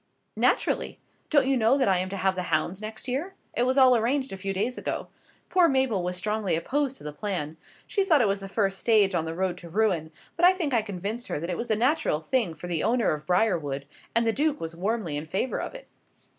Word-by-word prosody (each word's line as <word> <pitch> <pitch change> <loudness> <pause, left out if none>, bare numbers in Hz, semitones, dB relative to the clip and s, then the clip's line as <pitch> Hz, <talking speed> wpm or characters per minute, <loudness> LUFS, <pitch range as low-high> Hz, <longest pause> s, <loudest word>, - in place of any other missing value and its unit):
"Naturally; - - +1 0.3
don't 290 -4 +4
you 270 0 +2
know 240 +2 +3
that 265 - +2
I 190 -2 +3
am 185 +1 -2
to 195 - -4
have 190 0 +2
the 185 - -3
hounds 170 +5 0
next 220 +3 -7
year? 295 +10 -3 0.2
It 245 +1 +1
was 260 +2 +1
all 260 -2 +7
arranged 260 +2 0
a - - -5
few 195 +1 -3
days 215 +6 -1
ago. - - -4 0.4
Poor 360 -2 +5
Mabel 265 -8 +1
was 180 0 -2
strongly 210 -2 0
opposed 270 - -1
to - - -15
the 150 0 -6
plan. 160 -3 -3 0.3
She 400 - 0
thought 325 -6 +4
it 235 - +3
was 200 0 0
the 195 0 -8
first 195 -1 0
stage 210 -4 +4
on 165 -2 0
the 160 0 -4
road 185 0 -1
to 170 - -11
ruin; 180 -5 +1 0.2
but 335 - -3
I 360 +1 +8
think 330 -7 -2
I 230 - +4
convinced 210 +4 -5
her - - -2
that 170 +3 -4
it - - -1
was 235 - -4
the 220 - +2
natural 255 - +1
thing 190 0 -1
for 155 - -9
the 170 -3 -1
owner 240 -2 +2
of 150 0 -4
Briarwood; 165 -8 +1 0.3
and 230 0 +3
the 225 - +2
Duke 295 +4 0
was 165 0 -5
warmly 190 -4 -1
in 150 +2 -5
favour 195 +10 -1
of - - -6
it." - - -10
210 Hz, 245 wpm, -27 LUFS, 180-255 Hz, 0.4 s, I